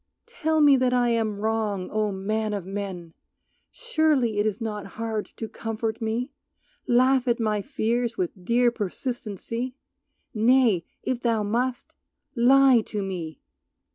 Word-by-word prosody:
Tell 315 0 0
me 285 -2 +7
that 250 -1 +2
I 245 -1 +3
am 220 -3 0
wrong, 215 -3 -1
O! 215 -1 0
Man 210 +3 -2
of 195 -4 -5
men, 190 -4 -6 0.6
Surely 310 - +1
it 210 - +2
is 210 0 -2
not 210 -3 -4
hard 220 -2 -3
to 225 - -4
comfort 225 +1 -4
me, 230 +5 -2 0.6
Laugh 255 +1 +3
at 235 -1 +2
my 215 -2 0
fears 235 0 -1
with 180 0 -3
dear 240 +4 +3
persistency, 235 +2 -4 0.6
Nay, 225 -5 +3 0.2
if 255 -2 -2
thou 230 -3 +1
must, 245 +4 -2 0.4
lie 260 0 +6
to 210 -2 -3
me! 170 -6 -5
225 Hz, 140 wpm, -25 LUFS, 210-250 Hz, 0.6 s, me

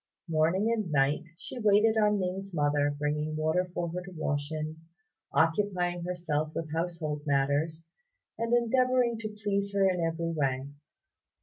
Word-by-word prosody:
Morning 165 +7 +2
and 215 -7 -2
night 145 +2 +2
she 250 - -7
waited 215 +1 +4
on 210 -1 +3
Ning's 190 0 -3
mother, 145 -1 +2
bringing 150 +1 -1
water 160 +4 +1
for 175 -1 -2
her 180 +2 -3
to 185 +1 -10
wash 145 -1 -2
in, 155 0 -4 0.5
occupying 175 +1 +1
herself 155 -4 -2
with 160 -2 -4
household 165 -3 -2
matters, 145 +4 +1 0.5
and 230 +1 -2
endeavouring 240 0 +3
to 215 -1 -4
please 205 -1 -2
her 195 -1 +4
in 180 -2 +1
every 165 0 -1
way. 135 -3 -1
170 Hz, 145 wpm, -29 LUFS, 155-200 Hz, 0.5 s, waited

